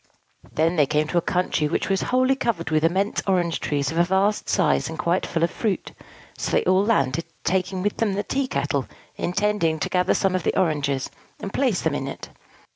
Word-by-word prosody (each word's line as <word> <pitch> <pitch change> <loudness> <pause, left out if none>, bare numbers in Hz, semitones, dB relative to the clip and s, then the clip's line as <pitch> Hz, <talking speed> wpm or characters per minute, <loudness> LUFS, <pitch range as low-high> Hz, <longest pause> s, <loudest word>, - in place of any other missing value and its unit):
Then 165 +3 +1
they 145 -3 +4
came 150 +1 +1
to 175 - +2
a - - -3
country 180 -4 0
which 150 - -1
was 195 -1 +1
wholly 255 +1 +3
covered 190 - -2
with 155 0 +2
immense 190 +5 +1
orange 175 -3 +1
trees 145 -1 -1
of 165 - -1
a - - +6
vast 190 +4 +1
size, 180 -5 +2
and 160 - -6
quite 170 +4 0
full 165 -1 -1
of 170 - +2
fruit. 215 -4 -2 0.5
So - - -2
they - - +2
all 185 +2 +3
landed, 165 - +1 0.2
taking 185 0 0
with 205 - -1
them 220 -3 +1
the 205 +1 -1
tea 275 -1 -1
kettle, - - -1 0.3
intending 190 -3 0
to - - -2
gather 180 0 +2
some 195 -2 +1
of 185 - 0
the - - 0
oranges, 145 -6 0 0.3
and 195 - -6
place 255 -9 +1
them 160 - +1
in 140 -1 -3
it. 140 - -7
180 Hz, 210 wpm, -23 LUFS, 160-200 Hz, 0.5 s, a